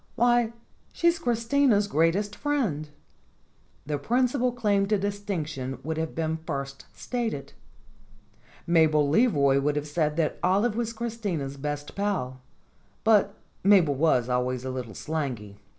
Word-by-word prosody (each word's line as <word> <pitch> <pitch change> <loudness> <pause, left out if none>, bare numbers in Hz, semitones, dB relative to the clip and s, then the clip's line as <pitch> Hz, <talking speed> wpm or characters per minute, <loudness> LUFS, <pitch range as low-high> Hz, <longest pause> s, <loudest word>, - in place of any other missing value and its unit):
Why, 240 -1 +3 0.4
she's 340 0 +2
Christina's 235 -3 +2
greatest 190 +4 +1
friend." 225 - -1 1.0
The 145 0 -2
principal 250 - +1
claim 205 -5 +1
to 210 0 +2
distinction 180 -10 -3
would 160 +1 -3
have 160 0 -3
been 160 -1 -1
first 140 -4 -6
stated. 230 - -4 1.1
Mabel 155 -3 +4
Leroy 145 - +3
would 145 +1 0
have 150 0 -2
said 150 0 -1
that 160 -2 0
Olive 205 +5 +2
was 230 -1 -1
Chris 230 0 -5
tina's 160 -11 -3
best 145 +1 -5
pal, 155 -11 -2 0.6
but 210 -2 +3 0.3
Mabel 185 -7 +5
was 135 -4 +2
always 125 0 -1
a 130 - -3
little 125 -5 -6
slangy. 125 -11 -4
165 Hz, 130 wpm, -26 LUFS, 145-220 Hz, 1.1 s, Mabel